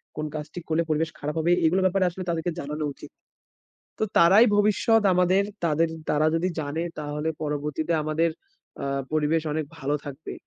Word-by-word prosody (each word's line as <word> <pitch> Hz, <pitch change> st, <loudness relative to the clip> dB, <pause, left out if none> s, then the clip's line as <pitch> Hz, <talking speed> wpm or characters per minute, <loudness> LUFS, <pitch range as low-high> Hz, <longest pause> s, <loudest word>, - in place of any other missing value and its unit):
কোন 155 Hz, -, -3 dB
কাজটি 150 Hz, +3 st, -6 dB
করলে 160 Hz, +1 st, +2 dB
পরিবেশ 155 Hz, +1 st, +1 dB
খারাপ 150 Hz, +2 st, -4 dB
হবে। 170 Hz, +2 st, +2 dB
এগুলো 185 Hz, +4 st, +3 dB
ব্যাপারে 185 Hz, 0 st, +2 dB
আসলে 185 Hz, +2 st, -7 dB
তাদেরকে 170 Hz, +1 st, -1 dB
জানানো 150 Hz, +2 st, -4 dB
উচিত। -, -, -13 dB, 0.9 s
তো 220 Hz, -, +1 dB
তারাই 195 Hz, +8 st, +7 dB
ভবিষ্যৎ 215 Hz, +2 st, +3 dB
আমাদের। 180 Hz, +2 st, +3 dB, 0.2 s
তাদের 165 Hz, +1 st, +2 dB, 0.2 s
তারা 150 Hz, +1 st, +2 dB
যদি 175 Hz, +3 st, +1 dB
জানে 150 Hz, +3 st, -3 dB, 0.2 s
তাহলে 150 Hz, +1 st, -3 dB
পরবর্তীতে 150 Hz, +2 st, -2 dB
আমাদের 160 Hz, +2 st, +1 dB, 0.5 s
আ -, -, -2 dB, 0.3 s
পরিবেশ 155 Hz, +1 st, +1 dB
অনেক 155 Hz, +1 st, -1 dB
ভালো 140 Hz, +2 st, -1 dB
থাকবে। 145 Hz, +2 st, -7 dB
160 Hz, 160 wpm, -25 LUFS, 150-175 Hz, 0.9 s, তারাই